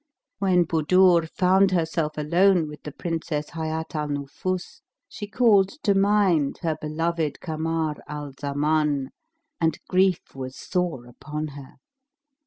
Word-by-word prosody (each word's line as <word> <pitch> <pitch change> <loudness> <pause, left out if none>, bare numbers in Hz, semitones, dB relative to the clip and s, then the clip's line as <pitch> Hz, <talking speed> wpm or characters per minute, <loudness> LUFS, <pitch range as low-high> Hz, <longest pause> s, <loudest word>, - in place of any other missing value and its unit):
When 185 -3 +3
Budur 170 +1 +4
found 190 +3 +3
herself 160 -3 -1
alone 170 +3 +3
with 150 -1 -10
the 150 - -7
Princess 160 -1 -3
Hayat 160 0 -4
al 150 -1 -2
Nufus, 145 +6 -4 0.3
she 205 - -7
called 205 -4 +4
to 200 - +4
mind 195 -7 +2
her 160 -2 0
beloved 155 -1 -2
Kamar 160 -1 -2
al 150 -1 -6
Zaman 145 0 0 0.5
and 160 -2 +1
grief 185 -1 +3
was 130 -1 -6
sore 175 -9 -2
upon 150 +5 -6
her. 140 -2 -11
160 Hz, 125 wpm, -25 LUFS, 150-180 Hz, 0.5 s, Budur